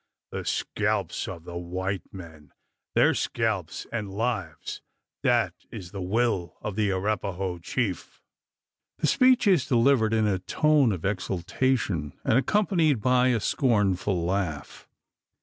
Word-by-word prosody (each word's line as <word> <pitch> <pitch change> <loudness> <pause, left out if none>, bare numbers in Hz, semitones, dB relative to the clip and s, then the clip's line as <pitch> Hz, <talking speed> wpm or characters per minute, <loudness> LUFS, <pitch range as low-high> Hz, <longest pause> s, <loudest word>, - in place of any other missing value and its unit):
The - - -5
scalps - - -1
of 85 -4 -7
the 85 0 -6
white 95 +2 -4
men 80 -6 -12 0.4
their - - +5
scalps - - -2
and 105 -4 -3
lives 100 -6 -3 0.4
that - - +2 0.2
is 85 -2 -8
the 100 - -6
will 95 -2 0
of 105 - -5
the 105 -1 +1
Arapaho 95 -2 -2
chief!" 95 +1 -3 0.8
The - - -1
speech 255 -1 +4
is 185 -8 +3
delivered 120 -2 +3
in 110 -1 +2
a 100 -3 +1
tone 150 - +3
of 90 -5 -4
exultation, 95 - -1
and - - +2
accompanied 165 - +2
by 125 +3 +3
a 120 -3 +2
scornful 100 -7 +1
laugh. 90 -5 -3
100 Hz, 130 wpm, -26 LUFS, 90-125 Hz, 0.8 s, their